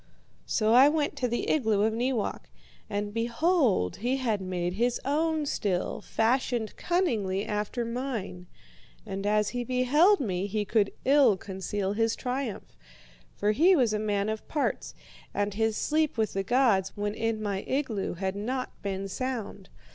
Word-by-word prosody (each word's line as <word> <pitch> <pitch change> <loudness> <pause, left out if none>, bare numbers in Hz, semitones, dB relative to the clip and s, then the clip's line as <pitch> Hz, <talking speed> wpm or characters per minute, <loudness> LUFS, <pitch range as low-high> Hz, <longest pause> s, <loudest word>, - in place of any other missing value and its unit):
"So 215 +1 +2
I 260 +4 +8
went 300 -1 0
to 250 - 0
the 240 0 -2
igloo 220 -8 +2
of 220 0 +2
Neewak. 230 - -2 0.4
And 205 0 -3
behold, 235 - +1
he 250 +5 0
had 225 -6 -1
made 180 -1 -2
his 240 +4 0
own 310 +2 +1
still, 200 -9 -1
fashioned 235 -1 0
cunningly 215 - 0
after 210 +3 -2
mine. 230 -7 -4 0.6
And 195 -1 -4
as 210 0 +2
he 245 -1 -3
beheld 270 - +4
me 195 -6 -1
he 210 +1 -2
could 205 -1 +2
ill 265 -7 +5
conceal 190 +1 -3
his 225 +1 +1
triumph. 250 -3 -4 0.6
For 210 - +1
he 345 - +5
was 245 -8 +2
a 210 - 0
man 205 -1 0
of 220 0 -4
parts, 295 - -2 0.4
and 205 0 0
his 220 +1 0
sleep 310 -3 0
with 220 -2 0
the 195 - 0
gods 200 -4 +2
when 205 0 -1
in 225 0 -1
my 200 -2 -2
igloo 255 -10 -1
had 190 +2 -2
not 255 +5 -3
been 195 -1 -3
sound. 220 -3 -4
220 Hz, 155 wpm, -28 LUFS, 200-255 Hz, 0.6 s, I